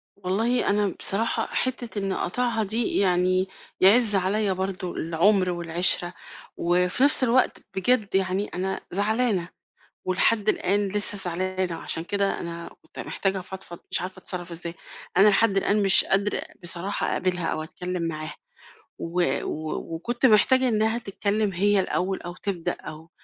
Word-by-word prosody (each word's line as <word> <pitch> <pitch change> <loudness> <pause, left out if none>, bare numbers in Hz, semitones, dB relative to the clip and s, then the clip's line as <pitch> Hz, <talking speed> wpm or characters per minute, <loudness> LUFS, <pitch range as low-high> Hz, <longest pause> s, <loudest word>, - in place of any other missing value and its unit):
والله 205 +6 -1
أنا 205 0 +1
بصراحة 220 +4 +1
حتّة 245 -4 -3
إن 195 -1 -3
أقاطعها 225 +4 -1
دي 220 +3 0
يعني 185 0 +1 0.3
يعز 210 +2 +6
عليّا 195 +2 0
برضو 185 -1 -4
العُمْر 180 +4 +1
والعِشْرة، 175 0 +2 0.4
وفي 180 +7 +1
نفس 280 -1 +6
الوقت 255 +1 +2 0.2
بجد 205 +1 +1
يعني 190 +1 0
أنا 190 +2 -4
زعلانة 205 -2 0 0.6
ولحد 205 +3 +1
الآن 200 0 +1
لسه 205 0 +6
زعلانة 185 -1 -2
وعشان 165 0 -2
كده 200 +2 -1
أنا 170 0 -7
كنت - - -16
محتاجة 195 -1 -2
أفضفض 185 -2 -9
مش - - +1
عارفة 185 +1 -7
أتصرف 180 -1 -4
إزاي، 170 0 -5 0.4
أنا 195 +3 +6
لحد 205 0 +3
الآن 205 +2 +1
مش 195 -1 +7
قادرة 200 +1 0 0.2
بصراحة 180 +3 +1
أقابلها 180 -2 -1
أو 155 - -2
أتكلم 180 +2 -6
معاها، 155 0 -6 0.6
و 175 +1 -1 0.2
و 155 0 -5 0.2
وكنت 240 +10 -1
محتاجة 255 +3 +4
إنها 220 +1 +1
تتكلم 205 -1 -2
هي 200 +2 +2
الأول 190 0 -2
أو 175 0 -8
تبدأ 185 -3 -3
أو 160 +2 -11
190 Hz, 140 wpm, -24 LUFS, 180-210 Hz, 0.6 s, مش